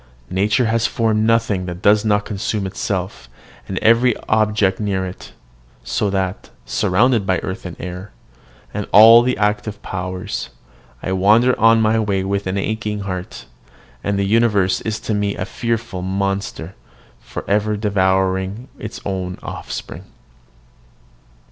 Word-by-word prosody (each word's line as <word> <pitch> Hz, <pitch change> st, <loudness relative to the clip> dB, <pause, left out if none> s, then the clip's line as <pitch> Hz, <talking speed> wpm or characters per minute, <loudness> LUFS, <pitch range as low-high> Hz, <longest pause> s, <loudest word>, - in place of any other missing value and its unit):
Nature 105 Hz, +6 st, +2 dB
has 115 Hz, 0 st, +1 dB
formed 110 Hz, -2 st, +1 dB
nothing 115 Hz, -5 st, +1 dB
that 90 Hz, +1 st, -7 dB
does 105 Hz, +1 st, +5 dB
not 105 Hz, -1 st, +1 dB
consume 105 Hz, 0 st, -2 dB
itself, 95 Hz, 0 st, -4 dB, 0.4 s
and 95 Hz, -, -4 dB
every 115 Hz, +1 st, +4 dB
object 105 Hz, -3 st, +2 dB
near 100 Hz, -3 st, -1 dB
it: 90 Hz, 0 st, -9 dB, 0.5 s
so 105 Hz, -, -1 dB
that, 95 Hz, -1 st, -2 dB, 0.2 s
surrounded 115 Hz, +4 st, +2 dB
by 95 Hz, -1 st, +1 dB
earth 95 Hz, 0 st, -5 dB
and 85 Hz, -, -8 dB
air, 90 Hz, +3 st, -7 dB, 0.6 s
and 105 Hz, -1 st, -4 dB
all 115 Hz, +3 st, +9 dB
the 125 Hz, +1 st, 0 dB
active 105 Hz, 0 st, -1 dB
powers, 90 Hz, 0 st, -4 dB, 0.5 s
I -, -, -2 dB
wander 105 Hz, +7 st, +4 dB
on 115 Hz, 0 st, +5 dB
my 110 Hz, +1 st, +3 dB
way 100 Hz, -3 st, 0 dB
with 100 Hz, 0 st, -2 dB
aching 105 Hz, +2 st, -2 dB
heart; 95 Hz, -2 st, -6 dB, 0.6 s
and 100 Hz, -1 st, 0 dB
the 100 Hz, -, +1 dB
universe 105 Hz, -3 st, +2 dB
is 110 Hz, 0 st, -3 dB
to 110 Hz, -, -2 dB
me 105 Hz, -1 st, 0 dB
a 90 Hz, -, -3 dB
fearful 115 Hz, -3 st, -3 dB
monster, 95 Hz, -2 st, -3 dB, 0.5 s
for -, -, -8 dB
ever 105 Hz, +1 st, +1 dB
devouring 95 Hz, +2 st, 0 dB
its 110 Hz, -, -7 dB
own 95 Hz, -2 st, -3 dB
offspring. -, -, -7 dB
100 Hz, 135 wpm, -19 LUFS, 95-110 Hz, 0.6 s, all